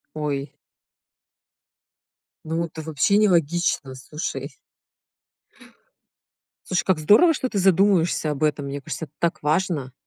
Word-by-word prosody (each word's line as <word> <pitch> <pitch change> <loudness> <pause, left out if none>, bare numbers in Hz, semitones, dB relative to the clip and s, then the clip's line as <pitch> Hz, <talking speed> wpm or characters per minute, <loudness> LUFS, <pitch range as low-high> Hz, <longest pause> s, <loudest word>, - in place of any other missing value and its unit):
Ой. 145 -2 -3 1.9
Ну, 165 +1 -2
это 160 -1 -9
вообще 160 +6 +1
нелогично, 170 -7 +1
слушай. 150 +4 -6 2.1
Слушай, 185 -2 0
как 190 -3 +2
здорово, 210 - +5
что 255 - -2
ты 210 -5 -2
задумываешься 185 -4 +2
об 145 +1 -4
этом. 150 -2 0
Мне 140 0 -5
кажется, 155 +2 -6
это 150 - -28
так 170 -2 -1
важно. 150 -3 0
160 Hz, 115 wpm, -23 LUFS, 150-185 Hz, 2.1 s, здорово